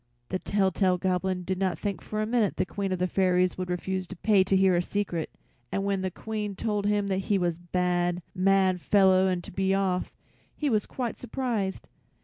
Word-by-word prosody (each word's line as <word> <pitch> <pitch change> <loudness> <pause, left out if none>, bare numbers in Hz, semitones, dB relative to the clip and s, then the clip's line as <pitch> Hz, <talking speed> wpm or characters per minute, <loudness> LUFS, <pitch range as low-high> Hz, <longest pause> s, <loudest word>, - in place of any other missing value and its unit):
The 185 - -1
tell 195 -1 +1
tale 185 -1 +2
Goblin 185 0 -1
did 185 +1 -2
not 190 -2 0
think 200 -2 -3
for 215 0 -3
a - - 0
minute 225 -2 +1
the - - +1
Queen 195 +2 -3
of 185 - 0
the 180 - +1
fairies 185 -1 +2
would 185 -1 -4
refuse 185 +1 -2
to - - -8
pay 200 +1 +3
to 190 0 +2
hear 190 -1 +4
a 175 - +3
secret, 180 -3 -2 0.4
and 195 - -1
when 200 -1 0
the 190 - -1
Queen 210 +1 -4
told 205 0 -1
him 205 -1 +1
he 195 +2 +1
was 175 -2 +1
a 165 - -17
bad, 175 -1 +1
mad 190 -1 +3
fellow 190 -1 +4
and 180 -2 -1
to - - -10
be 190 +1 +1
off, 190 -2 -1 0.4
he 295 -3 -1
was 215 -2 +1
quite 245 -3 -4
surprised. 230 -5 -3
190 Hz, 210 wpm, -27 LUFS, 180-205 Hz, 0.4 s, hear